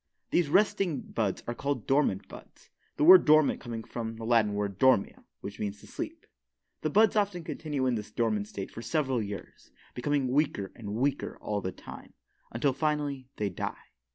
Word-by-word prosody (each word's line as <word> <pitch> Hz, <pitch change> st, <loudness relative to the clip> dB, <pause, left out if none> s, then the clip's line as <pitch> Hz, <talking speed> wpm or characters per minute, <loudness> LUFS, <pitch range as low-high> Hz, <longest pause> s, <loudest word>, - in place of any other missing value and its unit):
These 170 Hz, -4 st, +2 dB
resting 195 Hz, -5 st, +2 dB
buds 105 Hz, -4 st, -2 dB
are 120 Hz, -, -3 dB
called 140 Hz, -2 st, -3 dB
dormant 135 Hz, -8 st, +1 dB
buds, -, -, -14 dB, 0.3 s
the -, -, +1 dB
word 180 Hz, +3 st, +10 dB
dormant 155 Hz, -1 st, +4 dB
coming 115 Hz, -3 st, -5 dB
from 115 Hz, -1 st, -5 dB
the 115 Hz, -, -8 dB
Latin 110 Hz, -3 st, +3 dB
word 100 Hz, -2 st, -3 dB
"dormio," 130 Hz, -6 st, +3 dB, 0.2 s
which 100 Hz, -, -7 dB
means 105 Hz, -1 st, -3 dB
"to -, -, -15 dB
sleep." -, -, -7 dB, 0.6 s
The 155 Hz, -, 0 dB
buds 215 Hz, +5 st, +4 dB
often 200 Hz, -5 st, 0 dB
continue 150 Hz, -4 st, -3 dB
in 130 Hz, -, +2 dB
this 105 Hz, -2 st, -4 dB
dormant 105 Hz, -2 st, 0 dB
state 100 Hz, -2 st, -6 dB
for 115 Hz, -, -8 dB
several 135 Hz, -3 st, 0 dB
years, 100 Hz, -2 st, -8 dB, 0.2 s
becoming 135 Hz, +1 st, 0 dB
weaker 130 Hz, -8 st, 0 dB
and 105 Hz, -3 st, -6 dB
weaker 135 Hz, +4 st, -1 dB
all 105 Hz, -1 st, -2 dB
the 95 Hz, -, -3 dB
time, -, -, -12 dB, 0.4 s
until 130 Hz, +4 st, +1 dB
finally 145 Hz, -3 st, -1 dB
they 105 Hz, -1 st, -1 dB
die. -, -, -6 dB
125 Hz, 180 wpm, -29 LUFS, 105-150 Hz, 0.6 s, word